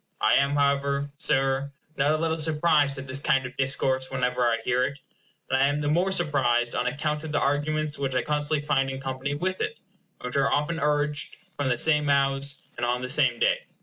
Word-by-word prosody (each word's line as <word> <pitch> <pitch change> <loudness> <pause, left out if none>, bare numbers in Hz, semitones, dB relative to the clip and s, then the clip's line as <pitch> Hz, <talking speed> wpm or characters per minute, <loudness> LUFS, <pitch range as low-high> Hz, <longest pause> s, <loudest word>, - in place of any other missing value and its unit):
I - - +3
am, 140 +1 +3
however, 140 0 +1
Sir, 135 -1 +1 0.2
not 140 +1 +1
a - - +1
little 160 0 -1
surprised 150 -2 +2
at 135 - -6
this 130 0 -2
kind 135 -2 +1
of 130 - -8
discourse, 130 -1 0
whenever 125 -1 -1
I 115 -1 +2
hear 125 +1 +2
it; 140 +2 -3 0.5
and 130 0 +1
I 135 - +5
am 145 +1 0
the 145 0 -1
more 180 +4 +2
surprised 130 -9 +1
on 125 - -1
account 150 +3 -2
of 160 - -6
the - - +1
arguments 150 +2 -1
which 135 -2 -2
I 125 - +1
constantly 150 0 -1
find 135 -2 +1
in 135 0 -5
company 135 +1 -3
with 185 +5 -2
it, 435 +2 -3 0.4
and - - -9
which 125 +2 -2
are 135 - +2
often 150 +3 0
urged 150 -1 -1 0.2
from 145 -2 -1
the 125 - +1
same 150 +2 +3
mouths 140 0 +1 0.2
and 120 - -5
on 120 +1 0
the 125 - -4
same 130 -3 +3
day. - - +1
140 Hz, 215 wpm, -26 LUFS, 130-150 Hz, 0.5 s, I